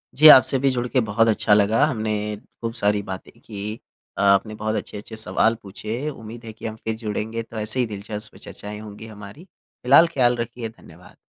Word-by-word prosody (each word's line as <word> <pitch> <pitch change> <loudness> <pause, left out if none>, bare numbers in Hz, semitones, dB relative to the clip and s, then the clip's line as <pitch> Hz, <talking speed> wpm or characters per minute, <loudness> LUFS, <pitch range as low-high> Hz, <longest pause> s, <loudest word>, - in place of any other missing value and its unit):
जी, 155 +3 +8
आपसे 135 -2 +8
भी 135 - +3
जुड़ 125 -1 -1
के 130 - +1
बहुत 110 +1 +2
अच्छा 105 -1 +3
लगा। 105 +7 +4
हमने 105 -5 -2 0.3
खूब 115 0 -3
सारी 105 -2 +1
बातें 95 -1 -7
की, 105 0 -6 0.4
अ, - - -1
आपने 100 +2 +3
बहुत 110 +1 -2
अच्छे-अच्छे 110 +2 -6
सवाल 110 +1 +2
पूछे, 110 +8 -5
उम्मीद 115 -3 -10
है 110 - -8
कि 110 - -11
हम 110 - -5
फिर 110 0 -2
जुड़ेंगे 110 +1 -4
तो 115 0 -11
ऐसे 110 +4 0
ही 125 - +3
दिलचस्प 105 0 -7
चर्चाएँ 105 0 -8
होंगी 105 0 -10
हमारी। 105 - -11
फ़िलहाल 150 -3 +3
ख़्याल 125 -7 +2
रखिए, 115 0 -4
धन्यवाद। 115 - -17
110 Hz, 190 wpm, -23 LUFS, 105-120 Hz, 0.4 s, जी